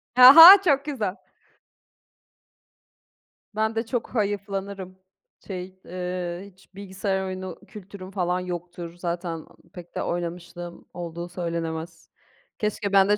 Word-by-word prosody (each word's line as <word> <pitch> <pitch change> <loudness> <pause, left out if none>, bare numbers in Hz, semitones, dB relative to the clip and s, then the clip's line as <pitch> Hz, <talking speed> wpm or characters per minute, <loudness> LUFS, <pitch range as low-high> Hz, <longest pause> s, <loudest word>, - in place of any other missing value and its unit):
Aha, 325 +10 +12
çok 285 -4 +2
güzel! 215 -10 -3 2.4
Ben 220 +1 0
de 225 +1 -1
çok 240 0 -3
hayıflanırım. 200 -2 -3 0.5
Şey, 185 -1 -7
eee, 180 0 -5
hiç 190 +1 -26
bilgisayar 190 0 -3
oyunu 185 -2 -6
kültürüm 195 -2 -11
falan 180 -2 -1
yoktur. 175 -1 -7
Zaten, 170 -1 -4
aaa, - - -17 0.2
pek 175 -1 -12
de - - -2
oynamışlığım 175 0 -6
olduğu 170 0 -6
söylenemez. 165 -1 -5 0.5
Keşke 210 -1 -2
ben 195 0 +5
de 210 - +4
185 Hz, 115 wpm, -24 LUFS, 175-200 Hz, 2.4 s, Aha